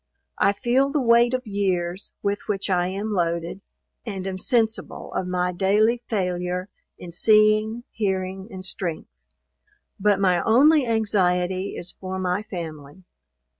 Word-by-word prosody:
I - - +4
feel 255 +5 +1
the 295 +1 0
weight 240 0 +4
of 255 0 -4
years 190 -3 -2
with 200 0 -2
which 200 -1 -2
I 180 -1 +2
am 200 +3 -3
loaded, 170 0 -1 0.4
and 195 -5 -5
am 190 -1 -4
sensible 225 +1 -1
of 185 - -2
my 180 0 0
daily 210 +6 +2
failure 180 -2 -2 0.3
in 175 - -9
seeing, 215 +4 +3
hearing 190 -2 -2
and 185 0 -7
strength; 175 - -4 0.9
but 205 0 +3
my 180 -3 +3
only 275 +4 +5
anxiety 190 -4 0
is 175 - -7
for 190 +1 -6
my 185 +1 -1
family. 160 -4 -8
195 Hz, 135 wpm, -24 LUFS, 180-220 Hz, 0.9 s, only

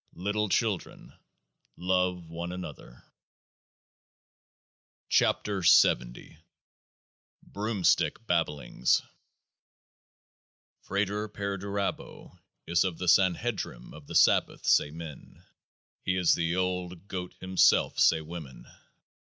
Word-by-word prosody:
Little 105 +3 -1
children, 105 -3 -2 0.6
love 90 -1 0
one 85 +2 -6
another! 90 -8 -9 2.1
86 100 -4 +3
KEOAAH - - +1
O - - -31 1.0
BROOMSTICK 105 +1 0
BABBLINGS 75 - 0 1.8
FRATER 105 +2 -2
PERDURABO 100 -1 -4 0.3
is 85 +1 +2
of 90 -4 -3
the 90 - -5
Sanhedrim 95 - +1
of 75 -1 -13
the - - -7
Sabbath, - - +3
say - - +4
men; 80 -1 -11 0.6
He 95 - -1
is 90 -2 +3
the 85 0 0
Old 90 0 -3
Goat 90 -2 -6
himself, 95 0 +3
say 80 - +4
women. 80 -4 -9
90 Hz, 90 wpm, -28 LUFS, 85-100 Hz, 2.1 s, say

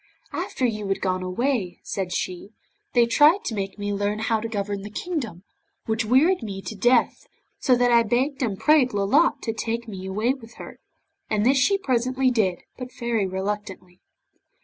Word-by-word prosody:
'After 260 - -2
you 215 -4 -2
had 195 - -1
gone 185 -1 -1
away,' 185 0 -1
said 190 -2 -3
she, 180 +1 -3 0.5
'they 240 -1 +6
tried 300 - +4
to 230 - -2
make 195 -1 -4
me 205 0 -3
learn 205 +1 -1
how 220 0 0
to 225 - -4
govern 205 -2 -3
the 205 - -7
kingdom, 230 - -4 0.4
which 220 +1 0
wearied 285 - +4
me 200 -4 -5
to 195 - -6
death, 240 +3 +2 0.3
so 255 - +3
that 245 0 +2
I 235 0 +6
begged 255 +5 0
and 215 -6 -1
prayed 295 -3 +4
Lolotte 200 0 +2
to 225 - -2
take 230 +1 -3
me 190 -3 -7
away 215 +6 0
with 235 -4 -13
her, - - -10 0.5
and 215 0 +1
this 270 +2 +4
she 395 +11 +3
presently 255 -5 +1
did, 195 -7 0 0.2
but 250 - -5
very 235 -5 0
reluctantly. 190 -1 -5
225 Hz, 180 wpm, -24 LUFS, 200-250 Hz, 0.5 s, they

